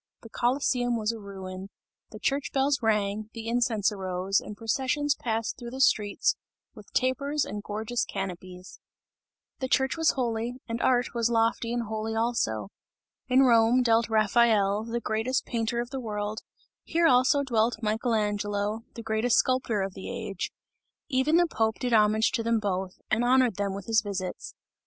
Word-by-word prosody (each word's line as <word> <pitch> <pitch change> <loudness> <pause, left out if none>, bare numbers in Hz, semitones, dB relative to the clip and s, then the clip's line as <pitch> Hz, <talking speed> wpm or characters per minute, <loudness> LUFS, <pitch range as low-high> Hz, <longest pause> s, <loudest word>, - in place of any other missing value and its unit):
The 230 - -11
Colosseum 245 -1 +1
was 215 0 0
a 230 - -7
ruin; 190 -1 -8 0.4
the - - -10
church 275 0 -1
bells 275 +1 +2
rang, 210 -1 0
the 225 0 -6
incense 230 -3 +1
arose 190 -1 -1
and 210 - -9
processions 270 +6 0
passed 225 -5 -3
through 240 -1 -7
the 260 +2 -7
streets 210 -6 +2 0.4
with - - -14
tapers 280 +3 0
and 205 - -5
gorgeous 220 +3 -2
canopies. 185 -1 -7 0.8
The 260 - -2
Church 265 +3 +1
was 325 -1 +3
holy, 235 -1 -2
and 230 0 -3
art 250 -1 +2
was 235 -1 +1
lofty 230 0 +1
and 240 0 -1
holy 220 0 -3
also. 165 - -1 0.6
In 255 +1 +4
Rome 240 0 +5
dwelt 230 -1 +3
Raphael, 215 -1 +3
the 235 +1 -2
greatest 225 +3 -1
painter 235 0 -1
of 240 +1 -4
the 270 - -3
world, 210 -2 -3 0.4
here 335 +1 +1
also 265 +1 +4
dwelt 230 -3 +1
Michael 225 +2 0
Angelo, 205 0 -1
the 230 - -7
greatest 220 +2 +1
sculptor 245 -6 +1
of 195 -1 -4
the 190 - -8
age; 195 -2 -4 0.6
even 270 +3 +2
the 350 - +5
Pope 220 -9 0
did 250 -2 -2
homage 215 0 +4
to 235 - -1
them 230 0 +1
both, 190 -2 -3
and 225 +3 +2
honoured 250 -3 +3
them 200 -1 -1
with 200 -1 -7
his 220 -1 +3
visits. 195 -3 -5
225 Hz, 165 wpm, -27 LUFS, 210-245 Hz, 0.8 s, Rome